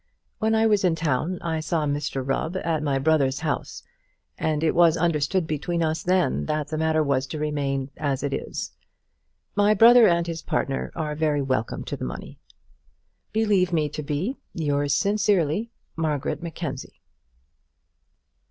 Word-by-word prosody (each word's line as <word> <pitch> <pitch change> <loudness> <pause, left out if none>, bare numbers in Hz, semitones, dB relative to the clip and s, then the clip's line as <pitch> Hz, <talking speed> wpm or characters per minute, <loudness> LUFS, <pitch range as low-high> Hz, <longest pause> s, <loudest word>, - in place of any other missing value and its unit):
When 220 0 +2
I 220 0 +3
was 210 -3 +3
in 175 -3 +3
town 160 +3 -1
I 165 -2 -1
saw 155 0 -1
Mr 145 -2 -2
Rubb 160 +6 -1
at 165 -4 -1
my 140 -3 0
brother's 140 -1 +2
house, 160 - -3 0.5
and 155 0 -1
it 160 - +2
was 170 -1 +5
understood 165 +1 +1
between 165 +3 -2
us 160 0 -1
then 185 0 +1
that 150 -1 -1
the 155 - -3
matter 160 0 +2
was 135 -2 0
to 155 - -5
remain 140 -3 -2
as 140 -2 -1
it 140 -1 -1
is. - - -4 0.8
My 205 +1 +4
brother 235 +2 +8
and 170 -2 +2
his 165 -1 -4
partner 135 - -2
are 155 -2 -2
very 150 -2 0
welcome 130 -4 -2
to - - -4
the - - -7
money. 60 - -7 0.9
Believe 205 -5 +2
me 155 -3 +1
to 150 - -5
be, 150 - -2 0.2
Yours 145 -3 0
sincerely, 200 -1 +1 0.3
MARGARET 155 -3 -2
MACKENZIE. 160 -5 -6
155 Hz, 155 wpm, -24 LUFS, 145-175 Hz, 0.9 s, brother